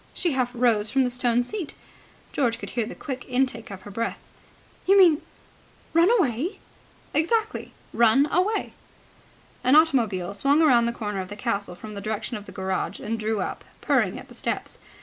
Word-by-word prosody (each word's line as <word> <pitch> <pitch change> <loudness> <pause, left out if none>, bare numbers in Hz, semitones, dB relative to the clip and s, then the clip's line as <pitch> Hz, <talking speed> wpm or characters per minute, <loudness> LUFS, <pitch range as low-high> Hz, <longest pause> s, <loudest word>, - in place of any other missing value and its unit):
She 345 - 0
half 255 -3 +1
rose 230 -3 +2
from 270 0 +3
the 250 - 0
stone 245 -1 +1
seat. 355 - -5 0.6
George 240 -5 +1
could - - -7
hear 235 -3 -1
the - - -7
quick 260 -3 -5
intake 250 -3 0
of 190 -2 -9
her 205 - -9
breath. 230 +3 -2 0.7
"You 395 +1 +6
mean 340 -6 +6 0.7
run 335 +3 +5
away?" 300 - 0 0.6
"Exactly. 435 +7 0 0.2
Run 235 +4 +5
away!" 375 +6 +1 0.9
An 255 +3 +5
automobile 230 - +3
swung 275 +9 +2
round 240 -6 +5
the - - 0
corner 210 -4 -3
of 185 - -7
the 205 - -8
castle 200 -2 -2
from 215 +4 -9
the 200 - -6
direction 215 +3 -3
of 210 -1 -8
the - - -9
garage, 190 -1 -3
and 225 +1 -3
drew 215 -1 -1
up, - - -4 0.2
purring, - - +1
at - - -10
the - - -14
steps. - - -4
240 Hz, 180 wpm, -25 LUFS, 210-290 Hz, 0.9 s, You